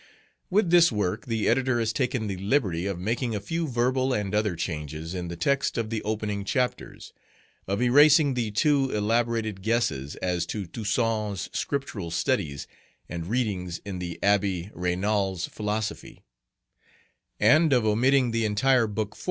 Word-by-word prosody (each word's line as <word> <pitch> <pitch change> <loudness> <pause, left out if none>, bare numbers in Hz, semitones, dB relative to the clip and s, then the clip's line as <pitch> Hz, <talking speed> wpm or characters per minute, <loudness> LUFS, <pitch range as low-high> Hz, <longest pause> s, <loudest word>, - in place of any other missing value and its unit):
With 190 -2 +2
this 170 -3 +6
work 105 -2 -2
the 115 -2 -1
editor 130 0 +2
has 115 -1 0
taken 125 -3 -1
the 100 -3 -3
liberty 95 - 0
of 100 -3 -3
making 115 +5 -2
a - - -1
few 165 +10 -3
verbal 130 +1 +1
and 105 -3 -2
other 105 -3 +1
changes 80 -1 -5
in 90 -2 -4
the 85 - -5
text 140 +13 0
of 115 -1 -2
the 110 -2 -2
opening 105 -1 -3
chapters; 125 +4 -3 0.5
of 100 +5 0
erasing 145 +3 +6
the 120 -3 -1
two 135 +5 +2
elaborated 110 -1 0
guesses 85 - -1
as 90 -2 -2
to 105 -3 -4
Toussaint's 105 0 -2
Scriptural 135 -11 -3
studies 85 - -1 0.4
and 85 -1 -5
readings 95 -7 -2
in 95 -3 -5
the 85 -2 -5
Abbé 100 -2 +1
Raynal's 95 +1 -1
philosophy; 105 0 -4 1.2
and 155 0 +5
of 125 -4 +3
omitting 125 +4 +3
the 115 0 0
entire 115 +3 +3
Book 105 0 -3
IV. - - -17
105 Hz, 150 wpm, -26 LUFS, 95-125 Hz, 1.2 s, this